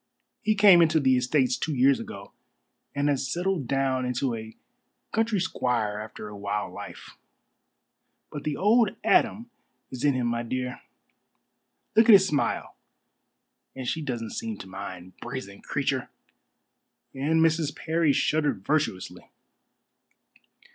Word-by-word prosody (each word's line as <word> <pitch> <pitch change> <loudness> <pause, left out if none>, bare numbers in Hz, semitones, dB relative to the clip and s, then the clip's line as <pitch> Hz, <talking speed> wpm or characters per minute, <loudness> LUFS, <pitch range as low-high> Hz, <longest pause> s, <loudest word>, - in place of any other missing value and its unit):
He 215 - +1
came 200 -4 +7
into 160 -1 +4
the 130 -2 +3
estates 125 0 +2
two 155 -2 -2
years 135 +2 +4
ago, 100 0 -9 0.6
and 140 +1 +1
has 140 -2 0
settled 175 -6 -1
down 135 -1 0
into 125 0 -1
a 110 -1 -8 0.5
country 225 -2 +1
squire 120 - -1
after 105 0 -8
a 105 - -9
wild 100 +1 -3
life. - - -10 1.1
But 145 - -6
the 150 -2 -2
old 215 +2 +3
Adam 235 +2 +2 0.4
is 130 -2 -6
in 145 -2 +3
him, 125 -1 -1
my 120 0 -1
dear. 125 +1 -4 1.1
Look 225 +1 +5
at - - +11
his 190 -1 +8
smile 145 -5 -1 1.0
and 130 -2 -6
she 160 - -1
doesn't 120 -6 -4
seem 225 -1 -4
to - - -10
mind. 95 -1 -8
Brazen 120 -5 -7
creature!" - - -2 1.0
And 150 +4 +1
Mrs. 160 -2 +2
Parry 160 -2 +1
shuddered 145 -9 0
virtuously. 145 -11 -1
135 Hz, 135 wpm, -26 LUFS, 120-160 Hz, 1.1 s, at